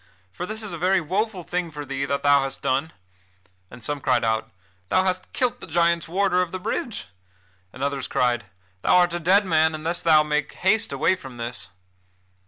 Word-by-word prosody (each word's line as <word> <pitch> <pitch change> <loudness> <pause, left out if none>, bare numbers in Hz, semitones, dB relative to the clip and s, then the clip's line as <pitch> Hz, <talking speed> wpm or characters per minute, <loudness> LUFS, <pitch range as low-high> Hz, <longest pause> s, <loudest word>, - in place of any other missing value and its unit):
For 180 - -6
this 220 +1 -4
is 205 -4 -6
a 170 - -5
very 185 +2 +3
woful 190 +3 -2
thing 175 0 -2
for 150 -1 -7
thee 135 0 -2
that 140 0 -2
thou 145 -1 +5
hast 135 0 -4
done!" 135 +5 0 0.8
and 120 -1 -12
some 145 +3 -1
cried 130 -1 +2
out: 110 0 0 0.4
"Thou 185 - +3
hast 185 -1 -2
killed 250 -1 0
the - - -7
giants' 170 0 +2
warder 180 +1 +2
of 180 -2 -2
the 185 - -4
bridge!" 220 - -4 0.6
And 130 - -7
others 140 -1 -1
cried: 120 -2 +1 0.4
"Thou - - +3
art 175 -1 +4
a 175 - -1
dead 190 +5 +4
man 160 -2 +3
unless 165 +3 -1
thou 155 -2 +5
make 150 -1 -1
haste 205 +4 +2
away 165 +7 +2
from 135 -9 -11
this." 120 +1 -4
165 Hz, 195 wpm, -24 LUFS, 140-185 Hz, 0.8 s, thou